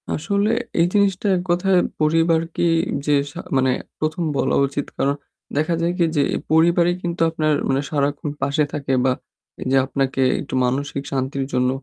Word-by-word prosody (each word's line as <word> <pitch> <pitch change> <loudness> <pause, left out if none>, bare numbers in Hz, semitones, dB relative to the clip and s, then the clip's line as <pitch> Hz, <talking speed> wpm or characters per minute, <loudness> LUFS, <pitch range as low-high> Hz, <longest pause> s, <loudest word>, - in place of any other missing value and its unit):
আসলে 200 +7 0 0.3
এই 170 - +5
জিনিসটা 200 -1 +2
এক - - -2
কথায় 180 +1 +3 0.2
পরিবারকেই 165 +1 +2 0.3
যে 150 - +2 0.2
সা - - -9 0.2
মানে 130 0 +3 0.3
১ম 155 +3 -1
বলা 135 - +1
উচিত 140 +1 -3
কারণ 140 +1 +1 0.4
দেখা 155 +3 +1
যায় 170 +1 +1
কি 175 - +3
যে 145 - +3
এই - - -2
পরিবারই 170 +2 +4
কিন্তু 170 -1 -3
আপনার 155 -2 0 0.2
মানে 135 +1 +2
সারাক্ষণ 145 0 -1
পাশে 140 +2 +1
থাকে 140 -3 -2
বা 130 - +4 0.6
যে 135 - +3
আপনাকে 135 0 -1 0.2
একটু 140 - -9
মানসিক 140 +2 -2
শান্তির 135 0 -2
জন্য 125 0 +2
155 Hz, 160 wpm, -21 LUFS, 140-170 Hz, 0.6 s, এই